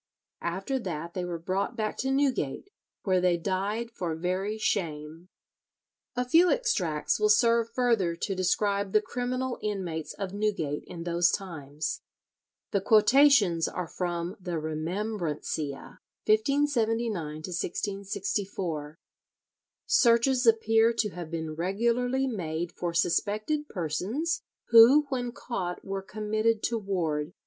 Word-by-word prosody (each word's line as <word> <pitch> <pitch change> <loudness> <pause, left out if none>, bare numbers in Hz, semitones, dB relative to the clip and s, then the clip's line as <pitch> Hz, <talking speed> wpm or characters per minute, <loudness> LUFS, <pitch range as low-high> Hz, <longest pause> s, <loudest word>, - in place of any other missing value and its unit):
After 195 +10 -2
that 170 -5 -5
they 180 - -3
were 175 -1 -3
brought 190 +7 -2
back 215 -2 -2
to 265 - -1
Newgate, 270 - 0 0.3
where 185 -2 +2
they 180 -1 +3
died 200 +6 -2
for 175 -7 -3
very 185 +5 -2
shame. 165 -4 -3 0.9
A 250 0 -1
few 335 +7 +5
extracts 185 - 0
will 210 0 +3
serve 230 +1 +4
further 230 -8 +1
to 195 - -3
describe 200 +2 0
the 215 - +5
criminal 250 +2 -3
inmates 185 -7 -3
of 195 -2 -5
Newgate 200 -9 -1
in 165 -1 -7
those 170 0 +2
times. 150 -6 -4 0.7
The 200 - +1
quotations 215 - +5
are 180 - -4
from 175 +1 -3
the 180 -3 -4
"Remembrancia," 155 -2 -3 0.3
1579 230 -1 +2
1664. 180 0 -3 0.9
Searches 245 +1 +4
appear 225 0 +4
to 230 -2 0
have 175 -3 -7
been 160 -1 -4
regularly 235 +9 0
made 175 -8 -3
for 175 0 -3
suspected 215 - 0
persons, 210 - -2 0.3
who 235 +6 +8
when 245 -3 -2
caught 190 -7 -5
were 195 0 -3
committed 215 +3 -1
to 230 -1 0
ward. 170 -6 -2
195 Hz, 120 wpm, -28 LUFS, 170-230 Hz, 0.9 s, who